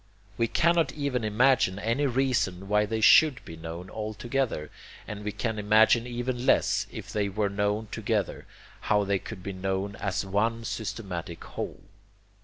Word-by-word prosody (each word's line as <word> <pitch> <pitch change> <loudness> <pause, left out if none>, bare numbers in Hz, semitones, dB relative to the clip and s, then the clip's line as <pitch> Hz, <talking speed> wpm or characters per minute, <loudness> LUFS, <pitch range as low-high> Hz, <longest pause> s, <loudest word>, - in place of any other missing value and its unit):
We 115 - +1
cannot 170 +6 +2
even 140 -5 -2
imagine 110 -2 +3
any 115 +8 0
reason 120 -8 0
why 105 +1 +2
they 110 +1 -2
SHOULD 140 +3 +6
be 80 - -8
known 80 +2 -7
all 110 +2 -5
together, 120 - -2 0.4
and 105 -1 -6
we 105 - -2
can 110 +1 -3
imagine 110 +3 +4
even 120 0 -3
less, - - +2
if - - -8
they 105 -1 0
were 100 +1 0
known 105 +2 -1
together, - - -2 0.4
how 105 0 +4
they 100 -1 0
could 90 - -9
be 100 - -4
known 95 +1 -2
as 100 0 -2
one 110 +4 0
systematic 95 -8 -5
whole. - - -6
105 Hz, 160 wpm, -27 LUFS, 100-120 Hz, 0.4 s, SHOULD